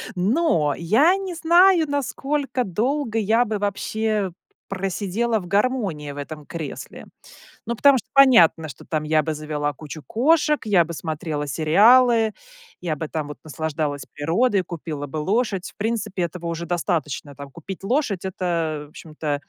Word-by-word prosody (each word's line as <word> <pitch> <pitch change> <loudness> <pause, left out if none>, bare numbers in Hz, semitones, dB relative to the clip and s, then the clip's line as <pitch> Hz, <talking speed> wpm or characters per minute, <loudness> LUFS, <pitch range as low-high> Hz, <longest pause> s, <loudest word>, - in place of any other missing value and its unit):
Но, 180 - +2
я 245 - +4
не 385 -2 -5
знаю, 345 +1 +5
насколько 280 -1 -2
долго 235 - -1
я 225 +3 +2
бы, 215 -1 -2
вообще, 205 0 -1 0.4
просидела 200 +4 -1
в 180 - -9
гармонии 200 - 0
в 140 - -10
этом 150 +1 -7
кресле. 165 -5 -7 0.6
Ну, 235 - -2
потому 280 +3 +5
что, - - -6
понятно, 230 - +6
что 130 - -11
там 155 -2 -2
я 155 0 +2
бы 155 +1 -2
завела 150 -1 -3
кучу 155 +2 -9
кошек, 300 +5 +2
я 190 -5 +4
бы 170 - -7
смотрела 155 -2 -4
сериалы, 220 - +5 0.5
я 170 -4 -2
бы 155 +1 -5
там 155 -2 -3
вот 150 - -9
наслаждалась 155 -2 -3
природой, 185 +7 +1
купила 160 -4 -6
бы 145 +2 -6
лошадь. 195 +3 -1
В - - -21
принципе, 215 -3 -2
этого 170 0 -5
уже 170 0 -3
достаточно, 160 -5 -2
там, 140 0 -10
купить 180 +6 -9
лошадь. 215 - 0
Это, 170 -5 -2
в - - -20
общем-то, 150 -3 -5
180 Hz, 155 wpm, -22 LUFS, 155-235 Hz, 0.6 s, понятно